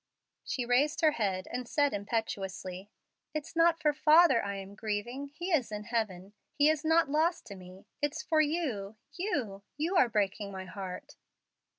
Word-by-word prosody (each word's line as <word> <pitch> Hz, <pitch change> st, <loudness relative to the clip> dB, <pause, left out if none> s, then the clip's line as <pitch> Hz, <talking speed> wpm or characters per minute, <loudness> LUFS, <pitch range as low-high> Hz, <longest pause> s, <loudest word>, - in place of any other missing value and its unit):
She 250 Hz, -, -3 dB
raised 260 Hz, +5 st, +2 dB
her 310 Hz, -2 st, +5 dB
head 195 Hz, -8 st, -1 dB
and 250 Hz, -1 st, -4 dB
said, 285 Hz, -1 st, +2 dB
impetuously, 195 Hz, -3 st, -4 dB, 0.5 s
"It's 305 Hz, +1 st, -5 dB
not 330 Hz, 0 st, +4 dB
for 300 Hz, -2 st, +2 dB
father 305 Hz, -3 st, +5 dB
I 200 Hz, 0 st, -3 dB
am 195 Hz, 0 st, -8 dB
grieving. 225 Hz, +6 st, -4 dB
He 345 Hz, +6 st, -6 dB
is 265 Hz, -9 st, +1 dB
in 210 Hz, 0 st, -4 dB
heaven 205 Hz, -4 st, -3 dB, 0.2 s
he 290 Hz, +1 st, +5 dB
is 310 Hz, -1 st, -2 dB
not 320 Hz, 0 st, +4 dB
lost 320 Hz, +4 st, +1 dB
to 200 Hz, -, -9 dB
me. 185 Hz, 0 st, -13 dB, 0.2 s
It's 290 Hz, 0 st, -1 dB
for 315 Hz, -2 st, +3 dB
you 275 Hz, -, -2 dB, 0.2 s
you. 265 Hz, -, -2 dB, 0.2 s
You 330 Hz, +6 st, -1 dB
are 250 Hz, -, +5 dB
breaking 205 Hz, -1 st, -1 dB
my 190 Hz, -1 st, -6 dB
heart." 185 Hz, -1 st, -8 dB
240 Hz, 170 wpm, -31 LUFS, 200-305 Hz, 0.5 s, her